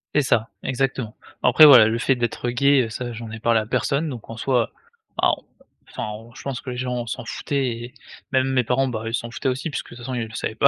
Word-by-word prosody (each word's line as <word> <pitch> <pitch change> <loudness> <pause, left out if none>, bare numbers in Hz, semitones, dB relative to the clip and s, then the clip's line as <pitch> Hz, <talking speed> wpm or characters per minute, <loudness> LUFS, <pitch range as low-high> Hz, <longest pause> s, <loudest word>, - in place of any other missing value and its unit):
C'est 150 - +5
ça, 115 -4 +1
exactement. 130 -3 -2 0.3
Après 135 +5 +8
voilà, 125 -7 +9
le 115 - 0
fait 135 +1 +2
d'être 120 0 -2
gay, 140 +2 +4
heu, - - -7
ça, 120 +2 -5
j'en 115 0 -7
ai 110 - -7
parlé 115 0 +3
à 110 - -3
personne, 140 +6 0
donc 120 -5 -8
en 115 - -7
soi, 125 -2 +1 0.5
bah, - - +4
on - - -18 0.5
enfin, - - -5
on 115 +2 -11
je - - -10
pense 135 -2 -3
que 130 - -8
les 125 - -5
gens 125 -1 -2
s'en 115 - -4
foutaient, 140 -2 -2
et 120 +1 -5 0.4
même 130 0 +2
mes 125 - +3
parents, 130 +3 +1
bah, 110 -3 -4
ils 115 - -4
s'en 115 0 -2
foutaient 130 - -2
aussi 130 +5 -2
puisque, 145 - -5
de - - -10
toute - - -12
façon, 130 - -4
ils 115 -3 -2
le 110 - -14
savaient 110 - -3
pas. 125 - +5
125 Hz, 265 wpm, -23 LUFS, 115-130 Hz, 0.5 s, voilà